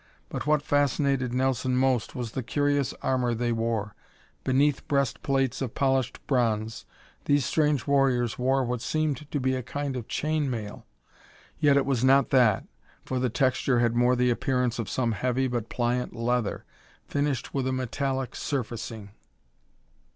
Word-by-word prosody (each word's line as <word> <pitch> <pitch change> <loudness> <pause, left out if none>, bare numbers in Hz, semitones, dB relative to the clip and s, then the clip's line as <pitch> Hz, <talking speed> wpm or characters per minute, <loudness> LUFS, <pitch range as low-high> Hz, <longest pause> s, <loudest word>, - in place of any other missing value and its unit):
But - - -5
what 150 -1 +3
fascinated 140 -3 +1
Nelson 130 0 0
most 130 -3 +1
was 120 -3 -4
the 130 - -3
curious 145 +2 0
armor 125 -2 +1
they 120 +1 -1
wore. 115 -2 -1 0.5
Beneath 135 +2 +2
breast 140 -3 0
plates 135 -2 0
of 125 -4 -3
polished 135 -2 0
bronze, 115 -4 0 0.4
these 145 -1 +3
strange 150 -4 +1
warriors 130 -5 +2
wore 130 +1 +2
what 120 -1 -2
seemed 150 -1 -1
to 145 - -1
be 130 0 +1
a 130 - -1
kind 140 +3 -4
of 120 -3 -5
chain 155 -2 -1
mail 110 -4 -6 0.7
yet 145 -2 +4
it 140 - +2
was 130 -3 0
not 135 0 +4
that, 120 -6 +4 0.4
for 130 - -2
the 125 0 +1
texture 130 +1 +1
had 120 -1 +2
more 120 +1 +4
the 125 0 +2
appearance 125 -1 0
of 115 - -3
some 120 -3 0
heavy 125 +4 0
but 120 -3 -3
pliant 120 0 -1
leather, 120 -2 -1 0.4
finished 145 -4 -1
with 135 -2 -1
a - - 0
metallic 130 +1 -2
surfacing. 115 -5 -4
130 Hz, 160 wpm, -27 LUFS, 120-140 Hz, 0.7 s, yet